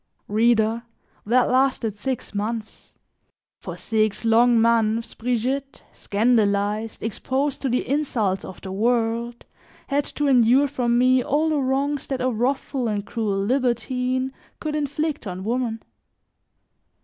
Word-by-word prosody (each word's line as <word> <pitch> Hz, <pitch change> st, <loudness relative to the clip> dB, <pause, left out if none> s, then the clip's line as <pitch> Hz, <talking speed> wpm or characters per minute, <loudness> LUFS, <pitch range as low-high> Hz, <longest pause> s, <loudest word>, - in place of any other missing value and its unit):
Reader, 225 Hz, +1 st, +2 dB, 0.5 s
that 245 Hz, +2 st, +3 dB
lasted 255 Hz, -5 st, +1 dB
six 250 Hz, +3 st, -4 dB
months: 215 Hz, +2 st, -5 dB, 0.6 s
for -, -, -7 dB
six 215 Hz, -1 st, 0 dB
long 230 Hz, +1 st, +5 dB
months, 230 Hz, 0 st, +2 dB
Brigitte, 255 Hz, +4 st, -2 dB
scandalized, 210 Hz, -1 st, 0 dB
exposed 265 Hz, +6 st, -2 dB
to 270 Hz, -, -1 dB
the 250 Hz, +1 st, 0 dB
insults 235 Hz, -9 st, 0 dB
of 185 Hz, -, -9 dB
the 190 Hz, -, -7 dB
world, 235 Hz, +2 st, 0 dB, 0.4 s
had 285 Hz, +1 st, +1 dB
to 295 Hz, -, -3 dB
endure 255 Hz, +2 st, +5 dB
from 240 Hz, -2 st, 0 dB
me 255 Hz, +1 st, +4 dB
all 300 Hz, +5 st, +1 dB
the 305 Hz, -2 st, +1 dB
wrongs 275 Hz, +2 st, -1 dB
that 265 Hz, -2 st, -2 dB
a 255 Hz, 0 st, +1 dB
wrathful 255 Hz, +2 st, -1 dB
and 205 Hz, -2 st, -2 dB
cruel 205 Hz, -4 st, -1 dB
libertine 255 Hz, +1 st, 0 dB, 0.3 s
could 305 Hz, -1 st, -3 dB
inflict 300 Hz, -2 st, -2 dB
on 185 Hz, 0 st, -5 dB
woman. 230 Hz, 0 st, -2 dB
240 Hz, 125 wpm, -23 LUFS, 220-265 Hz, 0.6 s, long